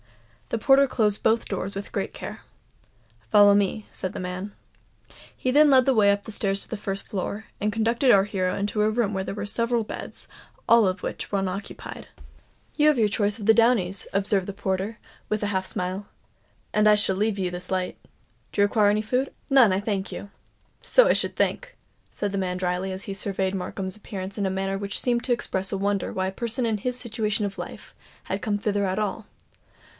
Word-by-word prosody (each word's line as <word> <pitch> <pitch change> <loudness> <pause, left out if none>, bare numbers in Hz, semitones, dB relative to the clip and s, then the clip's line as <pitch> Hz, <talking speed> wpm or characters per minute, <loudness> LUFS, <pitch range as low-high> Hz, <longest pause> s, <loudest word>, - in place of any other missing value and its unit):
The - - -1
porter 270 +4 +5
closed 210 -5 +1
both 225 +1 +2
doors 195 0 -4
with 200 +1 -6
great - - -2
care. - - -7 0.9
"Follow 205 -1 +7
me," 205 +1 +1
said 185 +1 -4
the - - -5
man. 185 +2 -5 0.8
He 255 - -2
then 295 +2 +6
led 260 -2 +6
the 270 - +4
way 205 -4 +5
up 200 +1 -2
stairs 200 -2 -1
to - - -13
the - - -3
first 195 -1 -4
floor, 205 +2 -4 0.2
and 210 +1 +1
conducted 230 +4 +2
our 195 -3 +6
hero 185 -3 -1
into 205 +1 -1
a 210 - +3
room 215 -2 0
where 190 -1 -1
there 195 - -5
were 205 -1 -4
several 230 +2 +1
beds, - - -8 0.4
all 230 -3 +6
of 185 +1 -2
which - - -5
were 200 - +1
unoccupied. 195 +1 -5 0.7
"You 300 0 +4
have 300 -3 +4
your 220 -2 +4
choice 205 +1 0
of 205 - -6
the 225 - +7
downies," 220 -5 +3
observed 195 -1 0
the - - -3
porter, 195 +2 -2 0.3
with 215 0 -1
a - - +1
half 190 0 -1
smile; 185 +2 -3 0.7
"and 215 0 +4
I 210 - +7
shall 205 -2 +3
leave 205 +1 0
you 185 -1 0
this 180 +1 -7
light. 185 -1 -1 0.5
Do - - -5
you 200 - +6
require 205 0 +3
any 210 +1 +1
food?" 255 +5 -1 0.2
"None, 260 -7 +7
I 185 - +1
thank 200 -2 -2
you." 200 - -7 0.5
"So - - +5
I - - +5
should - - -1
think," - - -1 0.3
said 205 - -3
the - - -1
man 180 -1 -2
drily, 180 +1 -1
as 190 +1 -5
he 200 - -5
surveyed 195 -1 -1
Markham's 190 +1 -4
appearance 200 -2 -7
in 200 -2 0
a - - 0
manner 195 +1 -2
which 200 -1 -3
seemed 240 -1 +1
to 255 - -2
express 195 -5 -1
a 195 - -1
wonder 200 0 -1
why 185 0 -1
a - - -2
person 235 +3 +1
in 220 -2 0
his 250 +4 -2
situation 220 -3 -1
of 200 -1 -5
life - - -8 0.3
had - - -4
come 210 -4 0
thither 205 0 0
at 190 +2 -1
all. 215 +1 -3
205 Hz, 210 wpm, -25 LUFS, 195-225 Hz, 0.9 s, Follow